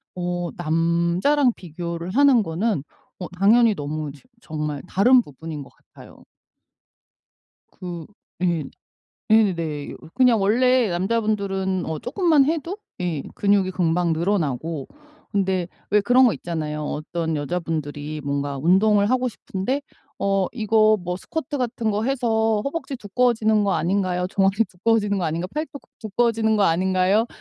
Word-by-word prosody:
어 175 -1 -2
남자랑 170 - +2
비교를 170 0 -6
하는 270 0 +5
거는 180 -1 -1 0.4
어 180 - -5
당연히 220 +3 +5
너무 150 0 -4
지 140 - -17 0.2
정말 150 -2 -4
다른 245 +8 +5
부분인 150 - -8
것 - - -15 0.2
같아요. - - -15 1.5
그 175 -3 -7 0.4
예 170 -4 +1 0.7
예네 170 -9 +1 0.2
그냥 250 -4 +4
원래 245 +3 +3
남자분들은 195 -1 -1
어 160 -1 -3
쪼끔만 305 +1 +3
해도 330 +4 -2 0.2
예 170 -6 -2
근육이 200 -2 +2
금방 175 -1 +1
늘어나고 160 -4 -1 0.4
근데 190 -3 0 0.2
왜 210 +1 +4
그런 245 +5 +5
거 235 - +3
있잖아요. 155 -3 -4
어떤 160 +2 -3
여자분들이 150 -1 -3
뭔가 140 0 -2
운동을 200 - +3
하고 255 0 +1
싶은데 220 +5 -3 0.4
"어 195 -1 +1
이거 215 -2 +3
뭐 180 0 -3
스쿼트 290 +7 -5
같은 235 -3 -1
거 210 +1 -1
해서 225 -4 +1
허벅지 280 -1 -4
두꺼워지는 220 -1 +1
거 200 -1 +1
아닌가요? 180 0 0
종아리 195 +3 +2
두꺼워지는 205 +1 +1
거 180 - -1
아닌가? 165 +2 -2
팔뚝 300 -2 -4 0.2
두꺼워지는 220 0 +1
거 205 - +3
아닌가요?" 185 +5 +2
190 Hz, 295 characters per minute, -23 LUFS, 170-225 Hz, 1.5 s, 하는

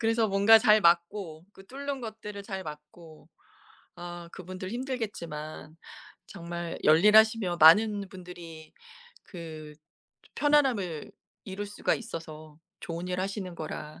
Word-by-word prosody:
그래서 225 0 +2
뭔가 200 +2 +6
잘 215 -1 +5
막고 170 -1 +1
그 195 - -16
뚫는 280 +3 -5
것들을 215 -3 -8
잘 190 -1 -6
막고. 155 +1 -12 0.7
아 175 -1 -8
그분들 185 0 -8
힘들겠지만 200 - -6 0.5
정말 170 -2 -6
열일하시며 210 +3 +5
많은 200 +5 +6
분들이 175 -4 -11 0.5
그 155 -4 -9 0.5
좀 - - -30
편안함을 255 - +1 0.3
이룰 200 +1 -6
수가 205 - -1
있어서 155 -8 -9 0.2
좋은 170 +2 -6
일 180 0 -2
하시는 190 -2 -4
거라 155 -1 -7
185 Hz, 255 characters per minute, -28 LUFS, 165-210 Hz, 0.7 s, 뭔가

